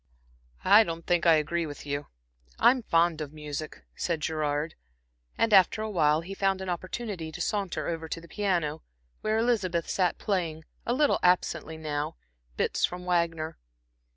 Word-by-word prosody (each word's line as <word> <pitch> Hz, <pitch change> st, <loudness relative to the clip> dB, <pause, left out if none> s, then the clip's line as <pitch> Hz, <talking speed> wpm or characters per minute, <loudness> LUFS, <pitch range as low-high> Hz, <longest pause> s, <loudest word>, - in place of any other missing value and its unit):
"I 205 Hz, +3 st, +8 dB
don't 165 Hz, -4 st, -5 dB
think 175 Hz, -1 st, +2 dB
I 165 Hz, -, +8 dB
agree 165 Hz, +2 st, 0 dB
with 145 Hz, -1 st, -9 dB
you. 145 Hz, 0 st, -3 dB, 0.5 s
I'm 255 Hz, 0 st, +5 dB
fond 170 Hz, -5 st, +2 dB
of 145 Hz, -2 st, -5 dB
music," 150 Hz, -, -6 dB
said 165 Hz, -2 st, -1 dB
Gerard, 150 Hz, 0 st, -1 dB, 0.6 s
and 230 Hz, -1 st, +2 dB
after 195 Hz, +2 st, +5 dB
awhile 160 Hz, -7 st, +2 dB
he 185 Hz, +4 st, -7 dB
found 195 Hz, -1 st, +1 dB
an 190 Hz, -1 st, -5 dB
opportunity 185 Hz, -1 st, -4 dB
to -, -, -8 dB
saunter 190 Hz, -7 st, -1 dB
over 165 Hz, -1 st, -3 dB
to -, -, -3 dB
the 170 Hz, -, -14 dB
piano, 170 Hz, -6 st, -1 dB, 0.4 s
where 215 Hz, 0 st, +1 dB
Elizabeth 200 Hz, -8 st, +1 dB
sat 180 Hz, -3 st, +1 dB
playing, 165 Hz, -6 st, -2 dB, 0.2 s
a 240 Hz, -, +2 dB
little 295 Hz, +1 st, +3 dB
absently 170 Hz, -3 st, +1 dB
now, 155 Hz, 0 st, -3 dB, 0.4 s
bits -, -, 0 dB
from 180 Hz, 0 st, 0 dB
Wagner. 165 Hz, -, 0 dB
170 Hz, 155 wpm, -28 LUFS, 155-195 Hz, 0.6 s, I